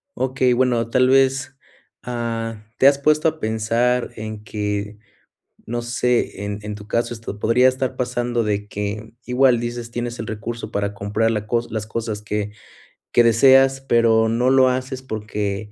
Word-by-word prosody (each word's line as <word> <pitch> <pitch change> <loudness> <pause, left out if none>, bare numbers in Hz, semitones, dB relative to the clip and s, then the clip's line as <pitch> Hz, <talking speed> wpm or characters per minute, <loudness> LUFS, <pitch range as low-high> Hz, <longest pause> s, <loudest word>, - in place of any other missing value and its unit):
Okey, 130 -1 +1
bueno, 120 -2 +1
tal 130 +1 +3
vez, 135 0 +2 0.5
ah, 115 -2 -4
¿te 135 - +7
has 140 0 +5
puesto 155 +2 +2
a 160 0 -1
pensar 115 +2 0
en 110 -1 -7
que, 105 -1 -3 0.7
no 120 +1 -3
sé, 120 -3 -1
en 100 0 -4
en 105 0 -5
tu 105 0 -11
caso, 120 +2 -1
esto 110 -3 -7
podría 125 +4 +4
estar 130 0 -3
pasando 120 -1 -1
de 105 -1 -2
que, 105 +2 -5
igual 125 -1 +3
dices 120 0 -4
tienes 120 0 -4
el 115 - -5
recurso 115 +2 -5
para 100 0 -2
comprar 105 +3 0
la 105 -1 -2 0.2
las 110 -1 -4
cosas 110 -2 -4
que 105 0 -3 0.6
que 120 - +5
deseas, 135 +3 +5
pero 115 -3 +3
no 125 +3 +2
lo 130 -1 +5
haces 130 +1 -3
porque 105 -3 -4
115 Hz, 160 wpm, -21 LUFS, 105-125 Hz, 0.7 s, te